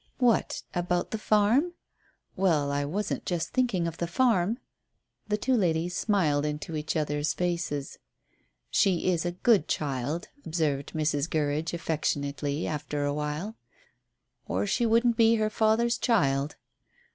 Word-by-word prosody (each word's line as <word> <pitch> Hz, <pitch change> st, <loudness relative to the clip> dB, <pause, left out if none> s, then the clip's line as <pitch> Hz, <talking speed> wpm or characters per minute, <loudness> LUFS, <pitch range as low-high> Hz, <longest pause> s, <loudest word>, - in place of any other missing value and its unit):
"What 240 Hz, -6 st, +2 dB
about 175 Hz, 0 st, -1 dB
the 220 Hz, -, -2 dB
farm?" 220 Hz, +12 st, +3 dB, 0.6 s
"Well, 160 Hz, -7 st, +2 dB
I 145 Hz, 0 st, 0 dB
wasn't 200 Hz, +8 st, -2 dB
just 175 Hz, -2 st, -2 dB
thinking 240 Hz, -9 st, +1 dB
of 165 Hz, -1 st, -5 dB
the 170 Hz, -, -1 dB
farm." 220 Hz, +1 st, +2 dB, 0.7 s
The 210 Hz, -1 st, +1 dB
two 260 Hz, +5 st, 0 dB
ladies 175 Hz, -5 st, +1 dB
smiled 165 Hz, -11 st, +2 dB
into 150 Hz, +2 st, -3 dB
each 155 Hz, +2 st, -2 dB
other's 150 Hz, -1 st, 0 dB
faces. 170 Hz, -5 st, -2 dB, 0.7 s
"She 185 Hz, -1 st, +3 dB
is 175 Hz, 0 st, 0 dB
a -, -, -1 dB
good 195 Hz, -2 st, +3 dB
child," 145 Hz, +3 st, -2 dB
observed 150 Hz, -4 st, -1 dB
Mrs. 155 Hz, 0 st, 0 dB
Gurridge 155 Hz, +2 st, -1 dB
affectionately, 145 Hz, -2 st, -2 dB
after 145 Hz, -1 st, -2 dB
awhile. 150 Hz, +8 st, -3 dB, 0.9 s
"Or -, -, 0 dB
she 235 Hz, +4 st, +1 dB
wouldn't 230 Hz, +1 st, +3 dB
be 230 Hz, -1 st, +5 dB
her 215 Hz, -1 st, 0 dB
father's 225 Hz, +2 st, +2 dB
child." 145 Hz, -, +1 dB
170 Hz, 135 wpm, -28 LUFS, 150-215 Hz, 0.9 s, be